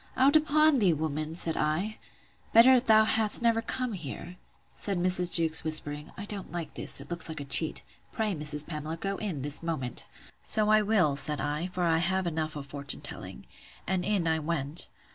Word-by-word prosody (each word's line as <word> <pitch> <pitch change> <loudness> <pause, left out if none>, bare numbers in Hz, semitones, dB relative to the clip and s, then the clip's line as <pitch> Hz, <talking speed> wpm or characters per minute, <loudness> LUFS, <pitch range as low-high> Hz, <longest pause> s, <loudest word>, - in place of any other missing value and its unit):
Out 275 +3 +4
upon 305 -1 +3
thee, 190 -6 +3
woman! 155 +1 -4
said 165 -1 +3
I, 170 +9 -2 0.5
better 250 +3 +7
thou 220 -3 +4
hadst 220 +1 +3
never 230 -1 +2
come 250 +1 -3
here. 175 +1 -8 0.4
Said 200 -2 -3
Mrs. 180 0 +1
Jewkes, 160 -1 +2
whispering, 150 -2 -3
I 205 - -7
don't 205 -2 -7
like 170 -3 -6
this: - - +1
it 140 +3 -11
looks 170 -1 -4
like 160 - -6
a 140 - -7
cheat: 140 +4 +3 0.3
Pray, 215 -2 -2
Mrs. 150 -2 +4
Pamela, 155 0 -6
go 195 +3 -4
in, 175 -11 -5
this 145 0 -1
moment. 155 -8 -4 0.4
So 215 -1 0
I 215 0 +5
will, 200 -9 +1
said 145 +1 +2
I; 150 +4 -3
for 180 -1 -4
I 165 -1 +2
have 190 +2 -1
enough 155 -2 -3
of 145 -2 -7
fortune 140 -1 -3
telling. - - -7 0.4
And 185 -1 -2
in 200 -5 -1
I 160 0 0
went. 155 0 0
170 Hz, 190 wpm, -28 LUFS, 150-210 Hz, 0.5 s, better